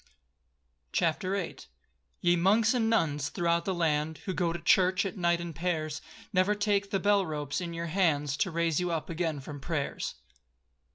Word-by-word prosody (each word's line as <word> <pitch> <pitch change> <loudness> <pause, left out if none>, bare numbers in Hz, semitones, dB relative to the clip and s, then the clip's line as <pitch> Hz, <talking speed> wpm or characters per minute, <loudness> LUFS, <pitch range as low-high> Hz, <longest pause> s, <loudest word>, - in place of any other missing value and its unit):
CHAPTER 185 +3 +1
VIII 200 - -3 0.6
Ye 175 -1 +4
monks 210 +6 +4
and 230 -3 +1
nuns 150 -10 +1
throughout 170 -2 0
the 190 - 0
land, 155 -2 0
Who 190 - -2
go 175 -2 0
to 170 - -3
church 185 +3 +3
at 190 - -3
night 170 -2 +2
in 170 -1 -5
pairs, 155 -2 -2 0.3
Never 190 +3 +3
take 205 -1 +1
bell 205 -1 +4
ropes 150 -1 -3
in 170 -1 -4
your 170 0 -3
hands, 155 -5 +1
To 190 - +1
raise 165 -1 +1
you 180 0 -1
up 165 -1 -3
again 165 -3 -1
from 145 +1 -8
prayers. 145 -1 -3
170 Hz, 170 wpm, -29 LUFS, 160-190 Hz, 0.6 s, Ye